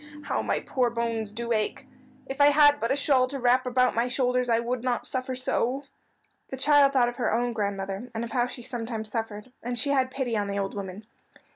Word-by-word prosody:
"How - - -1
my - - -1
poor 250 -2 0
bones 230 -2 -2
do 235 +2 -5
ache. 215 +4 -2 0.4
If 270 +2 -3
I 285 - +8
had 290 0 +6
but 230 - -1
a - - +3
shawl 275 -3 +3
to 275 +1 -5
wrap 250 +1 +3
about 250 0 +2
my 235 +2 +1
shoulders 250 -1 0
I 230 - +4
would 240 +1 -3
not 250 -2 -1
suffer 255 0 -3
so." 255 +1 -1 0.7
The 265 - -5
child 280 0 +5
thought 250 -3 +4
of 240 - -9
her 245 - 0
own 240 +2 +1
grandmother, 200 +1 -3
and 225 - -2
of 235 - -6
how 245 0 +1
she 245 -1 -8
sometimes 230 -3 -5
suffered, 225 +1 -5
and 245 +1 -3
she 280 +5 +1
had 260 -2 +2
pity 260 -3 -2
on 205 -1 0
the 200 0 -3
old 195 -1 -2
woman. 200 +1 -7
245 Hz, 225 wpm, -26 LUFS, 225-260 Hz, 0.7 s, I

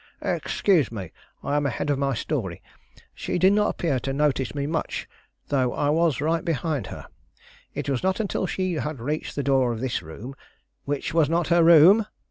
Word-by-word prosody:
"Excuse 175 - +1
me; 95 -7 -6 0.3
I 145 - -1
am 145 -1 +1
ahead 140 +3 -2
of 140 - 0
my 135 -2 0
story. 110 - -3 0.5
She - - -3
did 190 +2 +5
not 210 0 +3
appear 145 -7 -1
to 135 - -3
notice 140 -3 0
me 140 -1 -2
much, 160 +2 -3 0.4
though 130 -4 +1
I 145 0 +1
was 160 -2 +2
right 160 +2 0
behind 155 -3 -2
her. - - -8 0.7
It - - -4
was 135 -3 0
not 190 +2 0
until 200 -3 -1
she 185 -1 -2
had 150 -3 -3
reached 150 +6 -3
the 145 - -1
door 135 -3 +2
of 115 - -4
this 125 -8 -2
room 95 - -9 0.5
which 145 +1 -3
was 160 -3 +3
not 170 0 0
her 170 -1 +5
room!" 170 +7 +7
145 Hz, 190 wpm, -25 LUFS, 130-165 Hz, 0.7 s, room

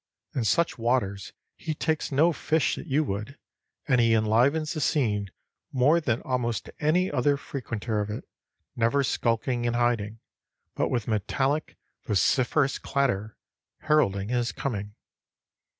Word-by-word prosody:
In 125 - -1
such 170 +2 +1
waters 115 -5 0 0.2
he 155 - -4
takes 155 0 -1
no 160 +5 +4
fish 160 0 +1
that - - -8
you 150 +2 +2
would, 110 +4 -4 0.5
and 125 -3 +4
he 115 -1 +4
enlivens 125 +9 +2
the 155 - -3
scene 105 -10 +1 0.4
more 145 +6 +3
than 120 -6 -1
almost 120 -3 -2
any 175 +5 +2
other 140 +3 +2
frequenter 115 -5 -4
of 105 - -4
it, 105 - -5 0.5
never 120 +5 +2
skulking 120 0 0
and 120 - 0
hiding, 115 -3 0 0.5
but - - 0
with 120 -4 -1
metallic, 135 +7 -1 0.3
vociferous 130 - +2
clatter 115 -6 -1 0.4
heralding 105 -11 +2
his 120 -1 0
coming. 105 -6 -4
125 Hz, 135 wpm, -27 LUFS, 110-145 Hz, 0.5 s, no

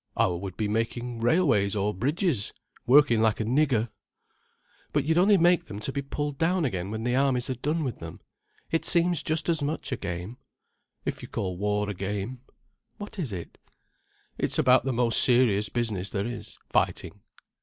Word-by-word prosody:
"I - - +4
would 90 +1 -4
be 105 - 0
making 115 +2 -2
railways 115 - +2
or 105 +1 0
bridges, 140 - -1 0.3
working 125 -4 +6
like 110 -1 +2
a - - 0
nigger." 125 -2 +2 1.0
"But 145 -2 +1
you'd 160 +2 +3
only 200 +2 +5
make 175 0 +4
them 105 -6 -7
to 110 - -3
be 140 - -2
pulled 145 +1 -4
down 175 0 +2
again 95 -7 -2
when 110 +1 -4
the 125 +1 0
armies 130 -2 +2
had 125 -2 -5
done 155 +2 0
with 130 -5 -4
them. 85 -1 -8 0.5
It 165 - +1
seems 170 -2 +3
just 155 +1 -2
as 165 -3 +1
much 145 +1 -3
a 130 - -1
game." 95 +4 -5 0.7
"If - - -3
you - - -8
call 95 -2 -3
war 105 +2 0
a 105 - -2
game." 100 +6 -4 0.6
"What 205 -1 -8
is 145 -10 -2
it?" 90 -4 -7 0.8
"It's - - 0
about 125 0 +4
the 135 - 0
most 120 -1 +2
serious 120 -5 +3
business 105 -6 -2
there 100 -1 -2
is, 120 0 -7
fighting." - - -1
120 Hz, 180 wpm, -27 LUFS, 105-150 Hz, 1.0 s, working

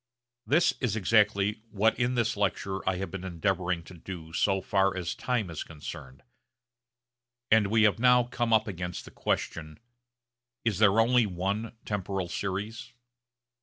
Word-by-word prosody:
This 160 +5 +4
is 120 -6 0
exactly 105 0 +2
what 110 +1 +2
in 125 +1 +1
this 120 0 +1
lecture 95 -1 -1
I 95 - 0
have 95 -1 -4
been 95 -2 -6
endeavouring 90 -1 -1
to 90 - -13
do 85 -2 -9
so 95 +3 +2
far 95 0 +1
as 85 -2 -2
time 115 -8 -2
is 80 - -5
concerned; 65 -4 -9 1.3
and 110 -2 +5
we 110 +2 +3
have 105 0 +3
now 125 0 +5
come 120 -1 -2
up 110 0 +4
against 90 -3 -5
the - - -12
question, 80 -1 -3 0.9
Is 105 -5 +1
there 105 0 +5
only 120 0 +4
one 100 +5 -3
temporal 95 -3 -3
series? 105 +6 -4
100 Hz, 150 wpm, -28 LUFS, 90-115 Hz, 1.3 s, and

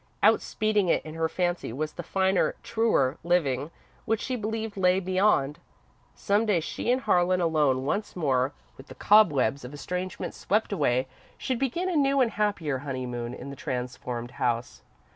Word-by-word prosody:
Outspeeding 215 -3 +2
it - - +1
in 155 - -7
her 160 0 -1
fancy 175 -7 -1
was 150 +5 -3
the - - -6
finer, 190 -1 +1
truer 170 - +1
living 150 -5 +1 0.4
which 225 -2 +1
she 255 - -3
believed 220 -1 -3
lay 185 -1 +3
beyond. 185 -6 +1 0.6
Some 210 +2 +1
day 200 -5 +3
she 165 +8 -2
and 255 +1 +1
Harlan, 180 -2 +2
alone 150 -6 +2
once 205 +9 -2
more, 135 -6 +1 0.3
with 135 - -13
the - - -11
cobwebs 145 - +4
of 125 +4 -8
estrangement 180 +5 -4
swept 210 +1 0
away, 130 -7 +1 0.3
should 255 -3 -2
begin 275 +8 -1
a 365 - -1
new 275 -2 +3
and 245 -3 +3
happier 175 -10 -1
honeymoon 125 -3 -4
in 140 - -8
the - - -7
transformed 125 -2 -4
house. 120 -1 -2
175 Hz, 160 wpm, -27 LUFS, 135-210 Hz, 0.6 s, cobwebs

